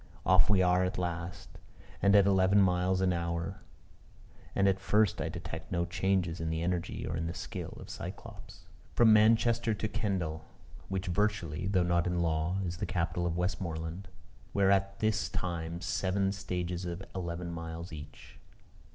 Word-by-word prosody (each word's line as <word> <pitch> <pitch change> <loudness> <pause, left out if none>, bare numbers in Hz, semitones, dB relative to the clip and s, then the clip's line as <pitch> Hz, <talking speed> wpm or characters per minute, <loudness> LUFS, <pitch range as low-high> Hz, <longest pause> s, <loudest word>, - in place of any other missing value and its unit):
Off 95 +2 +5
we 95 -3 +5
are 90 0 +3
at 90 - -1
last, 85 0 -5 0.4
and 100 +1 +5
at 100 -1 +7
eleven 95 0 +4
miles 95 0 +2
an 95 -1 +3
hour; 85 +2 -3 0.9
and 100 - +3
at 95 -1 +2
first 105 0 +2
I - - -1
detect - - -7
no 85 -1 +1
changes 90 -3 0
in 80 - -1
the 80 0 -1
energy 90 -1 -2
or 85 - -3
in 80 0 -2
the 85 - -4
skill - - -6
of - - -9
Cyclops. - - -9 0.3
From 115 -2 +6
Manchester 115 +1 +4
to 110 - -2
Kendal, 95 -8 -2 0.5
which 95 0 -2
virtually 90 -3 0
(though 95 -2 +2
not 85 0 +1
in 90 0 0
law) 80 +2 0
is 85 0 -3
the - - -3
capital 85 -1 -1
of 85 0 -2
Westmoreland, 90 0 -3 0.5
were 100 -1 +4
at 100 0 +2
this 110 -1 +1
time 85 -2 -3
seven 95 +1 0
stages 90 -2 -3
of 85 +1 -5
eleven 85 -1 -4
miles 85 +1 -6
each. 75 0 -11
90 Hz, 165 wpm, -31 LUFS, 85-95 Hz, 0.9 s, at